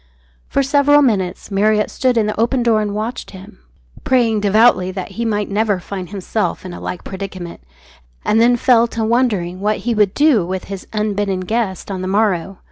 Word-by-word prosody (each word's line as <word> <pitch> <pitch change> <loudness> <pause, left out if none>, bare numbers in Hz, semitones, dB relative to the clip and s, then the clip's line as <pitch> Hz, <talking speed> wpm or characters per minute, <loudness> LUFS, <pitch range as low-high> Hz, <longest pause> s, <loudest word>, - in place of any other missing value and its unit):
For 275 - +1
several 290 +1 +4
minutes 195 -5 -1
Marriott 210 +2 +2
stood 255 -2 0
in 220 - +3
the 210 0 -3
open 240 +2 +1
door 225 -2 +3
and 205 -1 -3
watched 220 +4 -4
him; 190 - -13 0.4
praying 235 -4 +2
devoutly 205 -2 +3
that 185 -1 -5
he 235 - -4
might 210 -2 -1
never 205 -1 0
find 185 0 -7
himself 200 +1 -3
in 180 - -7
a - - -9
like 180 - -5
predicament, 190 -3 -7 0.6
and 225 - +3
then 245 +1 +5
fell 235 -1 +4
to 230 -1 -3
wondering 220 -7 0
what 210 +2 0
he 240 - +1
would 210 -3 +2
do 285 - +4
with 185 +2 -4
his 195 -2 -8
unbidden 205 -3 -1
guest 200 -1 -2
on 190 -1 -4
the 185 - -3
morrow. 195 -2 0
210 Hz, 190 wpm, -18 LUFS, 190-230 Hz, 0.6 s, then